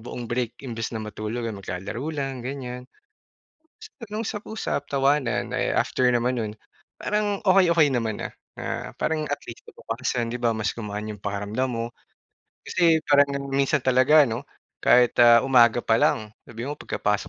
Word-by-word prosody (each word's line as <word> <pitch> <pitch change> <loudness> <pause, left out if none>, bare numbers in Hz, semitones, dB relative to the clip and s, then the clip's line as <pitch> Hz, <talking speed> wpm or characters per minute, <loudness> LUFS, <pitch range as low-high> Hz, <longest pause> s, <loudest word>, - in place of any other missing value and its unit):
buong 120 +1 -7
break, 120 0 -2
imbes 115 -3 -4
na 110 - -5
matulog, 110 +2 -5
eh, 115 - -2
maglalaro 100 +6 -5
lang 135 -4 -3
ganiyan. 125 -1 -6 1.2
Nag-usap-usap, 210 -6 -4
tawanan. 135 -2 +1
Ay, - - 0
after 130 - +1
naman 125 0 +1
nun, 110 -2 -3 0.4
parang 210 -1 -1
okey-okey 170 -6 +5
naman 115 -4 -2
na. - - -3 0.3
Ah, - - -5
parang 155 -1 0
at 145 - -3
least 115 - -11
kinabukasan 120 0 -3
di 120 - -3
ba, 120 -1 +1
mas 110 0 -1
gumaan 105 -1 -5
yung 105 - -6
pakiramdam 105 +5 -2
mo. 115 0 -2 0.8
Kasi 165 -3 +2
parang 145 -1 +5 0.2
minsan 140 +1 +1
talaga 130 +4 +6
ano, 115 -3 -4 0.3
kahit, 125 -1 +5
ah, 120 -1 +7
umaga 120 -3 +4
pa 115 0 +3
lang, 105 -1 +1 0.2
sabihin 120 +4 -5
mo - - -5
pagkapasok 105 -2 -1
125 Hz, 155 wpm, -25 LUFS, 115-140 Hz, 1.2 s, ah